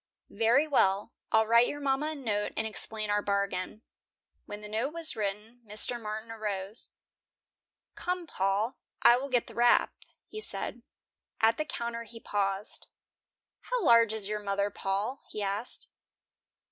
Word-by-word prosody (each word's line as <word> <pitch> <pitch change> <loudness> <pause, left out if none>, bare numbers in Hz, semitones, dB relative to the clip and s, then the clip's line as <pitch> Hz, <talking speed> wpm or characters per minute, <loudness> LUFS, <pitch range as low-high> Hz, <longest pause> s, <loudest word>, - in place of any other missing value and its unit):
"Very 235 +6 +3
well. 205 -6 +2 0.2
I'll 220 0 +4
write 235 +2 +5
your 290 - -4
mama 280 +1 0
a 315 - -3
note 215 -7 -2
and 220 - 0
explain 215 -1 0
our 205 0 +2
bargain." 200 +1 -2 0.6
When 205 0 -7
the 210 - -8
note 225 +8 -2
was 330 -1 +5
written, 215 +3 -4
Mr. 220 +3 +1
Martin 215 +1 -5
arose. 210 -1 -3 1.0
"Come, 360 -1 -3
Paul, 200 - -1 0.2
I 240 - +8
will 275 +2 -4
get 245 -3 +2
the - - -12
wrap," 240 0 +4 0.3
he 430 - -8
said. - - -2 0.6
At 225 0 +4
the 305 - -1
counter 235 -5 -4
he 230 0 -11
paused. 200 -1 -3 0.8
"How - - 0
large 230 -3 +6
is 220 -3 -2
your 210 0 -2
mother 200 0 -1
Paul?" 200 +8 -2
he 210 - -4
asked. 200 +4 -4
220 Hz, 150 wpm, -30 LUFS, 205-245 Hz, 1.0 s, I